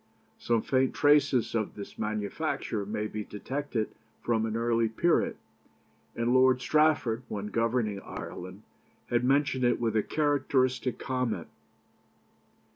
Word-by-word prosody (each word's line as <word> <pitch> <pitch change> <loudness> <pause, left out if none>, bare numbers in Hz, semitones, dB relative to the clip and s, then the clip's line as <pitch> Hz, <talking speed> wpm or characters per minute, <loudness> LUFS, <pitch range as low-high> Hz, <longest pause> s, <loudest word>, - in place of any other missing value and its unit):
Some 115 -2 +1
faint 130 -1 +1
traces 145 -4 +3
of 110 -3 -1
this 100 - -9
manufacture 105 -1 -2
may 105 0 -2
be 105 0 -4
detected 125 +2 -4 0.3
from 115 -1 +1
an 110 0 -2
early 115 -1 +1
period, 170 +10 +1 0.8
and 115 +1 +1
Lord 130 0 +5
Strafford, 150 -5 +2
when 105 0 -4
governing 115 -3 0
Ireland, - - -8 0.5
had 120 0 +2
mentioned 135 0 +2
it 120 0 +3
with 115 -2 0
a 110 - +4
characteristic 130 -3 +1
comment. 125 -9 -2
120 Hz, 120 wpm, -29 LUFS, 110-130 Hz, 0.8 s, Lord